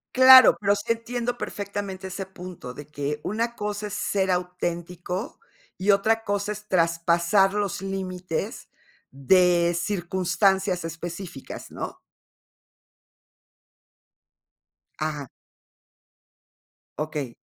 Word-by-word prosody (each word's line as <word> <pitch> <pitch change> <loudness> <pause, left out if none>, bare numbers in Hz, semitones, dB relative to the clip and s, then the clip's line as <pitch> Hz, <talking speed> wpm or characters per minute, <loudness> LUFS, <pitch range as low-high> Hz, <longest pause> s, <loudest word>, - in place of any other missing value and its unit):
Claro, 260 0 +9
pero 200 0 +2
sí 205 +3 -2
entiendo 240 +1 -4
perfectamente 200 -2 -5
ese 195 +1 -5
punto, 180 -8 -9
de 145 +2 -10
que 150 0 -3
una 230 +3 -2
cosa 210 -1 -3
es 205 - -8
ser 190 -2 0
auténtico, 180 - -3 0.4
y 195 +2 +3
otra 220 +3 +2
cosa 205 0 -1
es 210 0 -8
traspasar 170 +2 +3
los 205 -3 -2
límites 185 -3 -4 0.4
de 175 +4 +3
circunstancias 190 0 +1
específicas, 165 -1 -7
¿no? - - -6 3.0
Ajá. 150 -4 -3 1.7
Okey. 150 -5 -4
185 Hz, 95 wpm, -25 LUFS, 170-205 Hz, 3.0 s, Claro